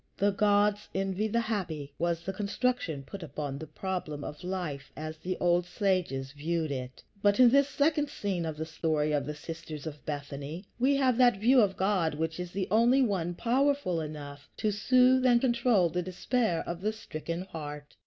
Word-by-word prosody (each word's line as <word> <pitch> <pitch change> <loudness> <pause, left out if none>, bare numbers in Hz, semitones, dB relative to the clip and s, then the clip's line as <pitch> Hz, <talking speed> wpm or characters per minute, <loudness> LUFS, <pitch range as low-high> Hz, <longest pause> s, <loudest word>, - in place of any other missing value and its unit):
"The 205 +1 +3
gods 205 +1 +2
envy 195 +2 0
the 235 +2 +1
happy," 170 -11 -3
was 170 0 0
the 195 - -3
construction 200 - -1
put 195 +8 -9
upon 145 -3 -5
the 160 - -7
problem 155 -3 -4
of 150 +4 -7
life 175 -7 -4
as 155 0 -6
the 185 +2 -3
old 175 0 +2
sages 175 -9 -1
viewed 155 +2 -2
it. 130 -1 -6 0.2
But 205 +2 +3
in 245 -2 +8
this 280 +1 +4
second 295 +1 +1
scene 190 -4 -2
of 160 -2 -4
the 160 - -3
story 155 -2 0
of 145 -2 0
the 150 - -4
sisters 155 -1 -7
of 150 -2 -7
Bethany 145 +4 -5
we 270 +3 +4
have 260 -3 +2
that 245 -4 +5
view 245 +5 +5
of 195 -2 +1
God 185 -5 +1
which 160 +2 -2
is 180 -1 -5
the 190 0 -2
only 240 +5 +5
one 180 -6 -1
powerful 255 - +1
enough 145 -2 -8
to 215 - +1
soothe 255 +5 +4
and 245 -2 +5
control 235 -6 +3
the 180 +2 -2
despair 185 +1 0
of 170 0 -4
the 215 +2 0
stricken 170 -5 -5
heart. 150 -5 -8
180 Hz, 185 wpm, -29 LUFS, 155-220 Hz, 0.2 s, in